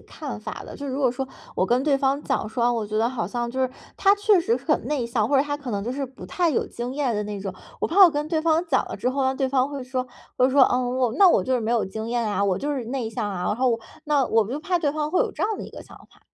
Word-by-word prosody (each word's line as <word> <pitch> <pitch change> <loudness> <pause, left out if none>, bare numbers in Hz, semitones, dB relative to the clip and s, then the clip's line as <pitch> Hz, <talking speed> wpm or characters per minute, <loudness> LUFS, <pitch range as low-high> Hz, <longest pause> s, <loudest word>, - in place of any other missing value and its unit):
看 - - -7
法 - - -7
的。 - - -9
就 285 - -6
如 265 +1 -3
果 260 -4 +3
说， 265 +1 -3 0.3
我 185 - +2
跟 245 +6 +2
对 285 -2 +3
方 275 +1 +1
讲 - - -1
说， 235 +1 -1
哦， 245 - +3
我 225 -3 -2
觉 215 +1 -3
得 230 - +2
好 245 -6 -3
像 240 +4 -3
就 260 +2 -3
是， 260 - +1 0.3
他 395 0 +5
确 410 -3 +4
实 450 +7 +1
很 - - -1
内 275 -6 -1
向， 230 -2 0
或 280 - +3
者 270 - +5
他 290 0 -3
可 285 -4 -7
能 200 -2 -2
就 245 - -2
是 275 0 -2
不 260 0 -11
太 350 -2 +1
有 275 - 0
经 240 +2 -5
验 275 -5 0
的 210 - -1
那 210 -1 -5
种， 190 -1 -5 0.3
我 - - +1
怕 390 +5 +5
我 345 - +7
跟 295 0 -2
对 320 -2 +1
方 325 +1 +2
讲 265 -5 +2
了 - - -5
之 - - -1
后， 270 +1 0
那 265 0 +1
对 265 0 0
方 265 0 +2
会 280 -2 -5
说， 255 0 -3 0.3
会 255 +1 +4
说：” 275 0 +5
嗯， 250 0 0
我 245 -3 +2
那 390 -2 +7
我 190 - +3
就 260 - +1
是 245 - +1
没 220 - -2
有 235 -2 +2
经 220 +4 -5
验 235 -1 0
啊， 200 -1 0
我 190 -2 +1
就 290 +1 -2
是 250 -4 -3
内 245 -3 -3
向 225 -3 -3
啊。 180 -3 -4
“然 - - +1
后 255 0 +2
我 230 - 0 0.3
那 290 -3 +2
我 220 -2 +2
就 275 +4 -3
怕 360 +2 0
对 305 -4 +1
方 300 +1 -2
会 365 - +2
有 - - +1
这 - - -5
样 430 0 0
的 - - -6
一 - - -10
个 - - -10
想 - - -15
法。 - - -24
260 Hz, 345 characters per minute, -24 LUFS, 235-290 Hz, 0.3 s, 我